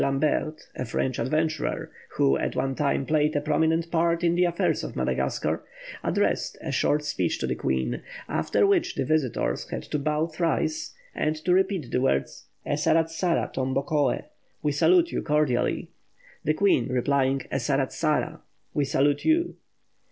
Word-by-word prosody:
Lambret, 155 +3 0
a - - -3
French 130 +1 -2
adventurer, 155 +2 -1 0.3
who 70 0 +4
at - - -2
one 135 +1 0
time 140 0 0
played 150 0 +2
a - - +3
prominent 160 +3 +1
part 170 0 +1
in 170 -1 +3
the 180 +1 +3
affairs 175 -1 0
of - - -6
Madagascar - - -1 0.4
addressed - - 0
a - - -5
short 150 0 +1
speech 95 - -1
to - - -2
the - - 0
Queen; 65 -2 -1 0.3
after 80 - +1
which 380 -2 +2
the - - -1
visitors 155 -6 0
had - - -4
to 150 - -3
bow 150 +2 0
thrice, 170 - -1 0.2
and 155 0 0
to 160 +3 0
repeat 185 - +1
the 125 - +1
words 70 - -1 0.2
"Esaratsara 165 +3 +1
tombokoe" 135 +3 0 0.4
(We 150 - +2
salute 340 - +4
you - - -1
cordially), 150 -5 0 0.5
the 155 - +1
Queen 185 -11 +3
replying, 135 +1 +1
"Esaratsara" 140 +4 0 0.3
(We 145 - +1
salute 145 +1 +1
you). 330 +2 +2
150 Hz, 150 wpm, -26 LUFS, 135-165 Hz, 0.5 s, who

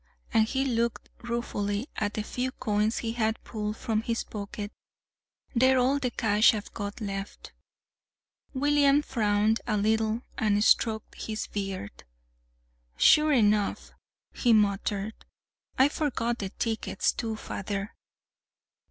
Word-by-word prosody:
And 220 -1 +4
he 265 +3 0
looked 235 -2 -1
ruefully 235 -2 -2
at 205 0 -2
a 215 - -1
few 250 +4 -3
coins 210 0 0
he 225 - -2
had 220 -1 -1
pulled 210 0 -4
from 220 -1 -1
his 230 0 -2
pocket. 205 0 -6 0.8
"They're 260 +1 +4
all 260 +3 +3
the 255 -3 0
cash 220 -1 +4
I've 210 - -7
got 205 +2 -5
left." 195 -2 -6 1.0
William 290 +1 +4
frowned 215 -3 +1
a 215 -2 +1
little 220 +2 +1 0.2
and 210 -1 +2
stroked 220 -1 +2
his 215 -1 -3
beard. 195 - -5 0.9
"Sure 305 - +6
enough!" 210 -5 +2 0.4
he 240 -2 +3
muttered. 205 0 +1 0.6
"I 265 - +6
forgot 250 -6 -1
the 195 - -3
tickets, 225 +3 -1
too, 225 -2 -3
father. 200 -1 -5
220 Hz, 125 wpm, -28 LUFS, 205-240 Hz, 1.0 s, Sure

